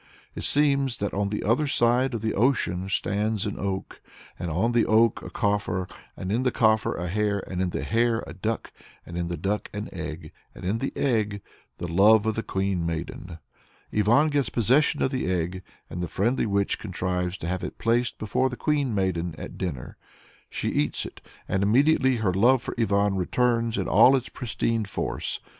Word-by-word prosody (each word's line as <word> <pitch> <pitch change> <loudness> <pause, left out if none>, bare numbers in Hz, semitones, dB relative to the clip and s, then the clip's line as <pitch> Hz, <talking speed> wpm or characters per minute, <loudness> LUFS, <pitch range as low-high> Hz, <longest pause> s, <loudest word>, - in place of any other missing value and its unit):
It - - -6
seems 140 -4 +2
"that 100 - -3
on 100 0 0
the 105 - -3
other 125 +8 +2
side 125 -1 +2
of 110 - -3
the 110 0 -1
ocean 100 -6 +1
stands 105 +2 0
an 105 - -4
oak, 95 -1 -4 0.4
and 85 - -3
on 95 +9 +1
the 120 -1 +3
oak 110 0 +3
a - - -8
coffer, 100 -3 -1 0.3
and 95 - -4
in 115 +4 +1
the 130 - +2
coffer 110 -2 +2
a 90 +2 -3
hare, 100 +2 0
and 95 -1 -3
in 95 - 0
the - - -3
hare 115 0 +1
a - - -8
duck, 110 +4 -3 0.3
and 85 - -9
in 85 0 -2
the 85 0 -3
duck 100 +5 -2
an 105 +1 -4
egg, 80 -2 -6 0.2
and - - -9
in 105 +5 0
the 135 - -2
egg 105 -6 0 0.3
the 85 - -4
love 100 +5 +5
of 110 - +1
the 115 - -2
Queen 95 -4 -1
Maiden." 85 +1 -5 0.6
Ivan 115 +9 +4
gets 145 -2 0
possession 135 +7 +2
of 130 - +1
the 130 -9 -1
egg, 90 +1 -2 0.3
and 90 - -6
the 90 - -2
friendly 115 +9 0
witch 100 -1 0
contrives 90 -2 -2
to 85 - -6
have 90 +1 -2
it - - -5
placed 120 +1 +1
before 120 +5 0
the 125 - -7
Queen 145 -6 0
Maiden 90 -4 -1
at - - -8
dinner. 80 -10 -5 0.5
She - - -2
eats 75 - -1
it, - - -10 0.3
and 95 - 0
immediately 130 +5 +4
her 105 -6 0
love 120 +6 +4
for - - -4
Ivan 100 -3 +2
returns 115 +4 +1
in - - -1
all 135 - +6
its 130 -2 -2
pristine 115 -1 -2
force. 100 - -3
105 Hz, 195 wpm, -26 LUFS, 95-120 Hz, 0.6 s, all